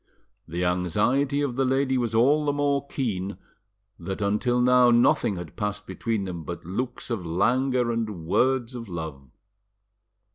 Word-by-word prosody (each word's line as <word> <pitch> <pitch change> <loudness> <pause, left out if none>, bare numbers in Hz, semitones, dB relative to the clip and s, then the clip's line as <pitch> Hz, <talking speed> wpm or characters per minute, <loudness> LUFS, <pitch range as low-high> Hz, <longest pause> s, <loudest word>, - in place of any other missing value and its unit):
The 85 +3 -2
anxiety 105 - +1
of 135 -4 -2
the 135 - +2
lady 130 0 +1
was 120 -3 -1
all 140 +7 +4
the 145 - +1
more 140 -1 0
keen, 100 -9 -3 0.6
that 95 +4 -5
until 105 +5 +1
now 125 0 +5
nothing 120 -3 +3
had 85 -4 -8
passed 105 0 -3
between 110 -3 -2
them 85 -3 -5
but 85 0 -7
looks 120 +8 -4
of 110 -6 -2
languor 125 +8 +1
and 105 -8 -3
words 130 +6 +1
of 115 -4 -7
love. 80 -6 -6
115 Hz, 150 wpm, -25 LUFS, 90-130 Hz, 0.6 s, now